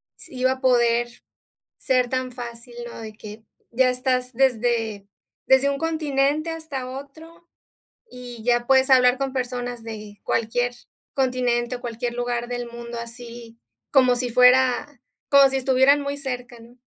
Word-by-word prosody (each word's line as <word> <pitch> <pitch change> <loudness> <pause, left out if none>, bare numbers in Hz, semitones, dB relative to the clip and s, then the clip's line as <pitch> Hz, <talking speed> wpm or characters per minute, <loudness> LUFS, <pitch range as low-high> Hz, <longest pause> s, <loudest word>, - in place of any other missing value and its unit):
se - - -13
iba 255 0 +1
a 260 - -11
poder 240 -2 +1 0.5
ser 250 -2 +1
tan 255 0 -2
fácil, 240 0 -9 0.2
¿no? - - -10
De 220 -1 -8
que 215 0 -11 0.3
ya 255 +2 +3
estás 250 0 -1
desde 230 -5 0 0.4
desde 265 +1 +4
un 280 - -1
continente 305 -1 0
hasta 310 -6 -5
otro, 315 +6 -11 0.6
y 245 -3 -10
ya 240 0 +1
puedes 265 0 +4
hablar 250 -1 +5
con 270 -1 -2
personas 245 -2 -4
de 215 -2 -9
cualquier 245 +2 0 0.4
continente 250 -2 0
o - - -13
cualquier 240 0 -4
lugar 240 0 -2
del 245 0 -5
mundo, 235 0 -8
así 235 -1 -10 0.3
como 255 -3 +5
si 245 0 -2
fuera 250 +2 +5 0.4
como 280 -1 +7
si 270 0 -1
estuvieran 265 +2 +4
muy 280 0 -3
cerca, 250 -3 -6
¿no? 235 +2 -17
250 Hz, 150 wpm, -23 LUFS, 240-265 Hz, 0.6 s, como